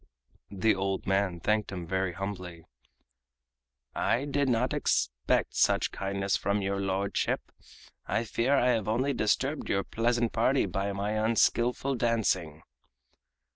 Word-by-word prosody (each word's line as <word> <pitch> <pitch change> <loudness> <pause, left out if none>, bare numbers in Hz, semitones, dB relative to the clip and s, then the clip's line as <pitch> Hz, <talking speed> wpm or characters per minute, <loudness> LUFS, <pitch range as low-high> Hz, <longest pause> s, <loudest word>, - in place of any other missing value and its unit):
The 100 +3 +2
old 95 0 -2
man 95 -2 0
thanked 105 +3 0
him 90 -3 -5
very 95 +1 -1
humbly: 90 -3 -6 1.3
"I 130 +4 0
did 140 -1 0
not 125 +1 +1
expect 60 0 0
such - - +2
kindness 100 0 -1
from 100 +1 0
your 100 0 -1
lordship. 95 +1 -1 0.6
I 115 - 0
fear 120 +4 +1
I 125 -1 +3
have 110 -5 +1
only 130 +6 +1
disturbed 135 +7 0
your 100 0 +1
pleasant 120 +2 0
party 130 +4 +2
by 95 +2 -2
my 100 +1 -2
unskillful 115 +4 +1
dancing." 105 - 0
100 Hz, 130 wpm, -29 LUFS, 95-120 Hz, 1.3 s, I